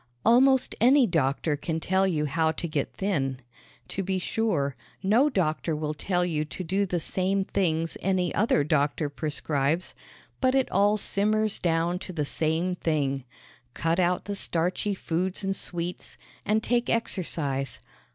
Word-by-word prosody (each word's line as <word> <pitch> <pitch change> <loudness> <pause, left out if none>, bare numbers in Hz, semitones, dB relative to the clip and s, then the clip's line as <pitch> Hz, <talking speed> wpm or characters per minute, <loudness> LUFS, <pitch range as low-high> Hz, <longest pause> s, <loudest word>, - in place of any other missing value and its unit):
Almost 260 +3 +5
any 260 +3 +6
doctor 150 - 0
can 160 +2 -3
tell 190 +3 +2
you 155 -5 0
how 160 +2 +1
to 170 - -4
get 150 -3 -2
thin. 135 -10 -1 0.5
To 195 - -2
be 190 0 -1
sure, 175 - -1 0.3
no 230 +10 +4
doctor 165 - 0
will 150 0 -2
tell 180 +4 0
you 155 -3 -1
to 155 +4 -6
do 195 +4 0
the 175 -1 -1
same 190 +4 0
things 165 -4 -1
any 185 -2 0
other 215 - +2
doctor 145 0 +1
prescribes, 150 +1 -1 0.5
but 260 0 +2
it 265 -1 +1
all 205 +1 +3
simmers 215 +1 +1
down 170 +1 0
to 185 - -7
the 150 -3 -1
same 160 +5 0
thing: 140 -6 -1 0.5
Cut 165 +2 0
out 180 0 +1
the 205 - -3
starchy 185 +2 0
foods 185 +3 -2
and 195 0 0
sweets, 175 -1 -4 0.3
and 215 +1 +2
take 240 0 +1
exercise. 140 - -1
175 Hz, 150 wpm, -27 LUFS, 155-200 Hz, 0.5 s, any